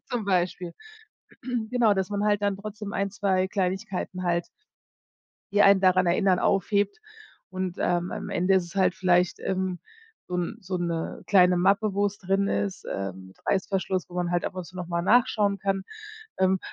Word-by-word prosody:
Zum 245 -4 -3
Beispiel. 180 -2 -1 0.7
Genau, 240 -2 +1
dass 190 0 -1
man 205 0 -1
halt 205 -1 +2
dann 200 -1 +1
trotzdem 210 0 -7
1, 200 0 -1
2 190 -2 +1
Kleinigkeiten 185 -1 -2
halt, 170 -1 0 1.0
die 205 0 +5
einen 200 -1 +6
daran 185 -1 +4
erinnern, 180 +1 +3
aufhebt 205 - +1 0.5
und, 185 -1 -3
ähm, 175 0 0
am - - -5
Ende 180 +2 +2
ist 190 -2 +3
es 170 - -12
halt 190 -2 +3
vielleicht, 180 -3 +2
ähm, 185 -1 -2 0.5
so 180 - -6
'n 180 +5 -2
so 185 -2 -4
'ne 170 -2 -3
kleine 180 -2 +5
Mappe, 200 +3 +2
wo 200 +1 +2
es 200 0 -4
drin 195 +1 0
ist, 195 -2 -2
ähm, 95 -1 -5
Reißverschluss, 190 -1 -1
wo 175 - -13
man 175 -1 -1
halt 175 - 0
ab - - -5
und 185 - -4
zu 185 - -15
noch 180 -1 -5
mal 170 -1 -1
nachschauen 205 -1 +3
kann. 195 0 -1 0.6
Ähm, 190 0 +2
190 Hz, 175 wpm, -26 LUFS, 180-200 Hz, 1.0 s, einen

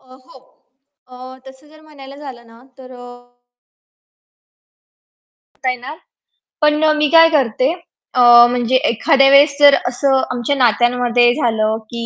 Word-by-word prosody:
अ, 255 0 -21
हो 255 +1 -19 0.7
अ, 255 +1 -14
तसं 265 +2 -18
जर 310 +1 -21
म्हणायला 280 -3 -16
झालं 265 -5 -13
ना 230 +1 -21 0.2
तर 255 -1 -15
अ 245 - -14 2.5
आता 260 - -6
आहे 250 - -3
ना, 270 +5 -10 0.7
पण 300 0 0
अ, 310 - +2
मी 300 0 -1
काय 330 +1 +4
करते 265 -3 -1 0.4
अ, 250 - 0 0.3
म्हणजे 245 +1 -3
एखाद्या 270 +4 +1
वेळेस 280 +1 +3
जर 285 -1 +5
असं 265 +2 -1
आमच्या 250 +3 -4
नात्यांमध्ये 240 0 0
झालं 220 -5 -2
की 235 -1 -7
260 Hz, 140 wpm, -15 LUFS, 245-285 Hz, 2.5 s, जर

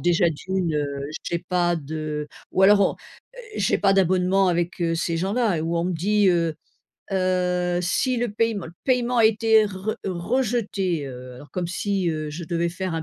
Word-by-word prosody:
déjà 175 +1 +3
d'une, 175 +1 -2
heu, 150 -1 0 0.4
j'ai 170 - -1
pas 175 0 0
de 150 -1 -4 0.2
ou 190 - +2
alors, 200 +1 +7
on 200 - +3
heu, - - -16 0.2
j'ai 195 - +1
pas 195 -1 +3
d'abonnement 185 0 +3
avec, 175 0 -1
heu, 165 -1 +1
ces 165 0 -1
gens-là 200 +2 +1
et - - -2
où 165 +1 -1
on 170 - 0
me 180 - -1
dit: 200 +4 +2
«Heu 170 -2 +2 0.6
heu, 180 -1 +1
si 250 +8 +1
le 235 -2 -1
paiem 220 -3 0 0.2
paiement 250 -2 +1
a 225 - +5
été 220 0 +4
re 200 +2 -4
rejeté, 195 - -1
heu». 125 -1 -9
Alors, 145 +4 -13
comme 180 -2 -2
si, 190 0 -1
heu, 155 -1 -3
je 165 +4 -6
devais 170 0 -1
faire 180 0 -4
un 160 - -2
180 Hz, 190 wpm, -24 LUFS, 170-205 Hz, 0.6 s, alors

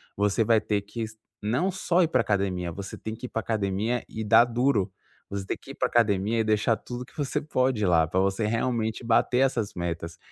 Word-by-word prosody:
você 105 +2 +2
vai 110 0 +3
ter 105 -2 0
que 105 +3 -7
s 110 0 -7 0.2
não 125 - 0
só 180 -1 +2
ir - - +3
para - - +3
academia, 95 -4 -1
você 95 +3 -7
tem 110 0 -5
que 120 +3 -8
ir - - -16
para - - -2
academia 110 +2 -1
e 110 - -5
dar 110 +2 +6
duro. 120 -5 +1 0.4
Você 100 -1 -3
ter - - -3
que - - -12
ir - - -10
pra - - +1
academia 110 -1 +2
e 110 - +3
deixar 110 +1 +2
tudo 125 +2 -7
que 125 - -19
você 145 +1 -1
pode 130 -6 0
lá, 85 -3 +4
para 90 - 0
você 95 +3 +1
realmente 115 0 -1
bater 120 +1 +2
essas 125 -6 +1
metas. 85 -1 -4
110 Hz, 220 wpm, -26 LUFS, 100-120 Hz, 0.4 s, dar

